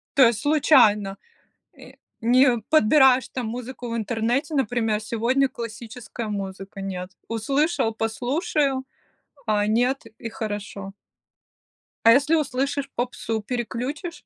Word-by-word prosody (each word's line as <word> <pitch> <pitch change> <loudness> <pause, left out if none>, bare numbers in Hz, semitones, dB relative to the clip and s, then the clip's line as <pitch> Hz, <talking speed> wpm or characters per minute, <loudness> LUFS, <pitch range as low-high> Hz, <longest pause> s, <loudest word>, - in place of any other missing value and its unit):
То 270 - +7
есть 230 -3 -1
случайно, 245 -10 +4 0.6
э, - - -14 0.3
не 245 +1 +4
подбираешь 265 -2 +5
там 250 -3 -4
музыку 245 +1 -6
в 230 - -2
интернете, 235 +7 -1
например: 225 -4 0
"Сегодня 240 +5 +1
классическая 230 0 -7
музыка", 195 -1 -6
нет, 185 -1 -5 0.2
услышал- 230 +2 0
послушаю, 265 +4 -1 0.6
а 210 -1 +1
нет- 245 +3 +1
и 230 - -5
хорошо. 205 -3 -6 1.1
А 230 - +9
если 285 +6 +4
услышишь 275 -1 -1
попсу, 230 -2 -3
переключишь? 250 +8 -4
240 Hz, 110 wpm, -24 LUFS, 215-270 Hz, 1.1 s, А